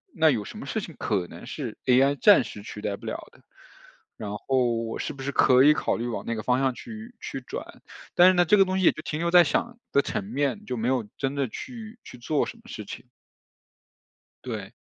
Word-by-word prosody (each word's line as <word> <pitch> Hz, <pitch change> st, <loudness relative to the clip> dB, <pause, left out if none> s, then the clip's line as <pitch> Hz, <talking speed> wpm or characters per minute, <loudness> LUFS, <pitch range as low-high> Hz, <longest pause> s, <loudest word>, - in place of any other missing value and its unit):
那 160 Hz, -1 st, +5 dB
有 110 Hz, -5 st, -1 dB
什 -, -, -9 dB
么 -, -, -7 dB
事 220 Hz, -, -1 dB
情 165 Hz, -5 st, -9 dB
可 100 Hz, -5 st, -1 dB
能 -, -, -11 dB
是 -, -, -5 dB
AI 135 Hz, +3 st, +4 dB
暂 205 Hz, -2 st, +7 dB
时 105 Hz, -, -9 dB
取 105 Hz, -, -8 dB
代 100 Hz, -1 st, -2 dB
不 -, -, -13 dB
了 -, -, -5 dB
的， -, -, -22 dB, 0.8 s
然 105 Hz, -1 st, -5 dB
后 125 Hz, +2 st, +1 dB
我 115 Hz, -, -5 dB
是 -, -, -3 dB
不 135 Hz, -1 st, -9 dB
是 140 Hz, -, -2 dB
可 130 Hz, -1 st, +5 dB
以 150 Hz, +1 st, +7 dB
考 -, -, -1 dB
虑 120 Hz, -, -3 dB
往 120 Hz, -, -4 dB
那 115 Hz, -, -1 dB
个 110 Hz, -, -5 dB
方 125 Hz, +1 st, +2 dB
向 135 Hz, -2 st, +1 dB
去 230 Hz, -, -9 dB
去 135 Hz, -, -5 dB
转。 -, -, -8 dB, 0.3 s
但 175 Hz, +1 st, +8 dB
是 -, -, +4 dB
呢， 175 Hz, 0 st, +4 dB
这 210 Hz, +6 st, +5 dB
个 195 Hz, -, +6 dB
东 185 Hz, +1 st, -1 dB
西 185 Hz, -, +2 dB
也 -, -, +7 dB
就 155 Hz, -, -9 dB
停 150 Hz, -1 st, -3 dB
留 170 Hz, 0 st, 0 dB
在 175 Hz, -1 st, +8 dB
想 235 Hz, +9 st, -1 dB
的 140 Hz, -, +4 dB
层 100 Hz, -, -3 dB
面， 140 Hz, -, -2 dB
就 125 Hz, -, -3 dB
没 115 Hz, +2 st, -1 dB
有 125 Hz, -5 st, 0 dB
真 135 Hz, 0 st, -1 dB
的 140 Hz, -2 st, 0 dB
去 230 Hz, -, -8 dB
去 125 Hz, -, -11 dB
做 145 Hz, +4 st, 0 dB
什 230 Hz, -, -8 dB
么 -, -, -19 dB
事 105 Hz, -, -7 dB
情。 120 Hz, -, -9 dB, 1.4 s
对。 -, -, -6 dB
135 Hz, 260 characters per minute, -26 LUFS, 120-180 Hz, 1.4 s, 但